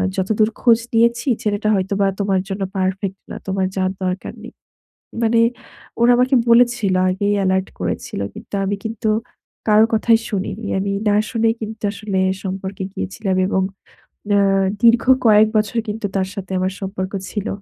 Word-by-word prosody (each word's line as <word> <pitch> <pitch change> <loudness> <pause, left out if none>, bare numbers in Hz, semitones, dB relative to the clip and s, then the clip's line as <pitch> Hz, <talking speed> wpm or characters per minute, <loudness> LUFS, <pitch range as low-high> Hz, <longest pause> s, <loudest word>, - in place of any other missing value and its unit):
যতদূর 215 +3 +1
খোঁজ 230 -2 +5
নিয়েছি 235 +3 +2 0.2
ছেলেটা 210 0 0
হয়তোবা 195 +1 0
তোমার 195 -2 +1
জন্য 195 +1 -4 0.2
পারফেক্ট 190 +1 -2
না। - - -5
তোমার 190 -1 0
যাওয়ার 185 0 0
দরকার 185 +1 -3
নেই।" - - -10 0.7
মানে 230 0 +3 0.6
ওরা 240 +1 +6
আমাকে 255 +2 +3 0.2
বলেছিল, 235 -5 +4 0.2
আগেই 200 +2 0
এলার্ট 190 0 +1
করেছিল। - - -3
কিন্তু - - -10
আমি 200 +1 -1
কিন্তু 220 0 -3 0.6
কারো 215 +1 +6
কথাই 225 +1 +4
শুনিনি। 205 +1 -3
আমি 200 +1 -1 0.2
না 205 - +3
শুনেই 225 -1 +1
কিন্তু 220 0 -7
আসলে 200 -2 -3 0.3
সম্পর্কে 190 0 -5
গিয়েছিলাম 190 0 -3
এবং 190 - +1 0.7
আ - - +5 0.4
দীর্ঘ 230 0 +5 0.2
কয়েক 215 0 +6
বছর 215 +2 0
কিন্তু 210 0 -3
তার 190 -1 0
সাথে 190 -2 -6
আমার 185 +1 -1
সম্পর্ক 190 0 -4 0.2
ছিল। 210 0 -3
205 Hz, 150 wpm, -19 LUFS, 190-225 Hz, 0.7 s, ওরা